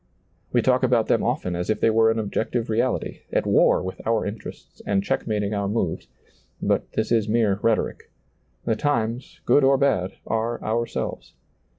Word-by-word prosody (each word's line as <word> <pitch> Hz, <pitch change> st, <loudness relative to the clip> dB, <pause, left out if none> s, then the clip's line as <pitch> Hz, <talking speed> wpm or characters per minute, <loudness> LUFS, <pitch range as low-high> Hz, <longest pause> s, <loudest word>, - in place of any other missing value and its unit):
We -, -, +2 dB
talk -, -, +3 dB
about -, -, +3 dB
them -, -, +3 dB
often 90 Hz, -1 st, -1 dB
as 90 Hz, 0 st, -3 dB
if 110 Hz, -, +1 dB
they 115 Hz, -, +3 dB
were 110 Hz, 0 st, +4 dB
an 110 Hz, -, +1 dB
objective 110 Hz, +2 st, -2 dB
reality, 120 Hz, +3 st, -1 dB
at -, -, +1 dB
war -, -, +4 dB
with 95 Hz, 0 st, -6 dB
our 115 Hz, -1 st, +1 dB
interests 105 Hz, +2 st, -8 dB
and 100 Hz, -1 st, 0 dB
checkmating 105 Hz, 0 st, -1 dB
our 100 Hz, -1 st, -1 dB
moves; 100 Hz, -5 st, -2 dB, 0.5 s
but -, -, 0 dB
this 110 Hz, +1 st, -1 dB
is 110 Hz, -2 st, +2 dB
mere 105 Hz, -3 st, +2 dB
rhetoric. 115 Hz, -2 st, 0 dB, 0.6 s
The 115 Hz, -, +1 dB
times, 120 Hz, -2 st, -2 dB
good 140 Hz, +4 st, +4 dB
or 135 Hz, 0 st, +5 dB
bad, 95 Hz, -10 st, +1 dB
are 115 Hz, +1 st, -1 dB
ourselves. 115 Hz, +2 st, -3 dB
110 Hz, 170 wpm, -24 LUFS, 100-115 Hz, 0.6 s, or